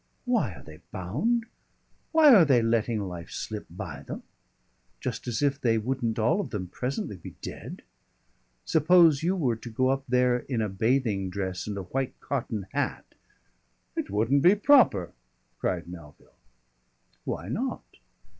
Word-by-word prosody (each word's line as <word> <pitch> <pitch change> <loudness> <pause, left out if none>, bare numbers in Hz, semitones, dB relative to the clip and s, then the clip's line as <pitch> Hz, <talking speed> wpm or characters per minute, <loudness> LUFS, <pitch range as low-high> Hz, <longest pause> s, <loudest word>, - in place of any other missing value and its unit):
Why 225 - +1
are - - -13
they 80 -1 -12
bound? 155 - -1 0.7
Why 310 -4 +7
are 200 -7 +8
they 130 -6 +4
letting 115 -1 +1
life 85 -2 -7
slip - - -5
by - - -7
them? - - -7 0.8
Just - - -4
as 120 +4 -1
if 140 -1 +1
they 115 -2 +3
wouldn't 115 0 -1
all 155 - +2
of 195 - -6
them 90 -5 -4
presently 125 -3 -4
be 85 - -11
dead! - - -7 0.8
Suppose 160 -2 +5
you 180 +4 +1
were 130 - 0
to 115 - -9
go 130 +3 +1
up 135 0 0
there 125 0 +3
in 125 -1 -3
a 110 -1 0
bathing 110 -1 0
dress 95 0 -4
and 105 -1 -4
a 100 - -4
white 135 +7 -3
cotton 115 -7 -3
hat - - -3 0.4
" - - -44
"It - - -3
wouldn't 115 +8 +2
be 180 +7 +6
proper!" 210 - +4 0.5
cried 85 -2 -2
Melville. 85 -4 -12 0.9
"Why 85 - -4
not?" 255 - -2
120 Hz, 155 wpm, -27 LUFS, 100-145 Hz, 0.9 s, are